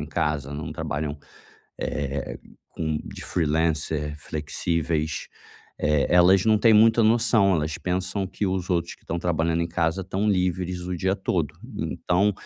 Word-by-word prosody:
em 75 - -4
casa, 75 -3 -1
não 75 +1 -5
trabalham, 75 0 -3 0.6
eh, 70 -4 -3 0.3
com 80 -2 -2
de - - -9
freelancer 75 -2 0
flexíveis, 80 +1 -2 0.5
eh, 75 -2 +2
elas 90 +2 +6
não 110 -1 +4
têm 115 +1 +5
muito 115 +2 +6
a 110 - +4
noção, 110 -4 +4
elas 75 -1 -1
pensam 95 +2 -1
que 100 - -4
os 95 0 -2
outros 85 -1 0
que - - -32
estão 85 - -3
trabalhando 85 -1 0
em 85 - -2
casa 85 +3 0
estão 95 +3 -1
livres 90 -1 0
o 90 0 -3
dia 95 +3 +1
todo, 85 -5 -1 0.2
então 100 +4 +1
85 Hz, 155 wpm, -25 LUFS, 75-95 Hz, 0.6 s, elas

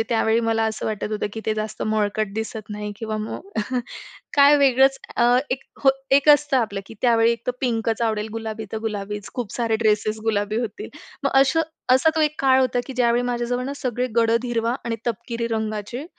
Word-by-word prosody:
म्हणजे - - +4
त्यावेळी 225 0 +2
मला 225 -1 +1
असं 220 0 -2
वाटत 215 0 -3
होतं, 210 - -1
की 220 - -5
ते 215 - +1
जास्त 215 0 -4
मळकट 215 -1 0
दिसत 220 -1 -5
नाही 210 0 -5
किंवा 220 -1 -4
मग, 220 - -6 0.9
काय 285 +1 +7
वेगळंच 270 -1 +4 0.2
अ, 240 +1 +4
एक 260 +1 -2 0.2
हो 270 - +7 0.2
एक 280 +2 +4
असतं 290 -1 +5
आपलं, 205 -5 0
की 225 - -11
त्यावेळी 230 -1 +4
एकतर 235 +2 -3
पिंकच 230 -2 0
आवडेल, 220 -1 0
गुलाबी 220 -1 -5
तर 220 - -2
गुलाबीच, 210 -2 -4
खूप 240 -5 -4
सारे 230 -2 0
ड्रेसेस 215 -1 +1
गुलाबी 210 -1 0
होतील. 240 - -5 0.3
मग 280 - +1
असं 325 +4 +3 0.3
असा 265 +5 +5
तो - - +2
एक 300 0 +1
काळ 265 -1 +4
होता, 250 -1 +1
की 265 - -6
ज्यावेळी 240 0 +3
माझ्याजवळ 245 +1 -1
ना 275 - -3
सगळे 250 -2 -2
गडद 230 +1 +3
हिरवा 235 0 0
आणि 230 -1 -2
तपकिरी 235 +1 -3
रंगाचे 220 +3 -3
230 Hz, 195 wpm, -23 LUFS, 215-250 Hz, 0.9 s, काय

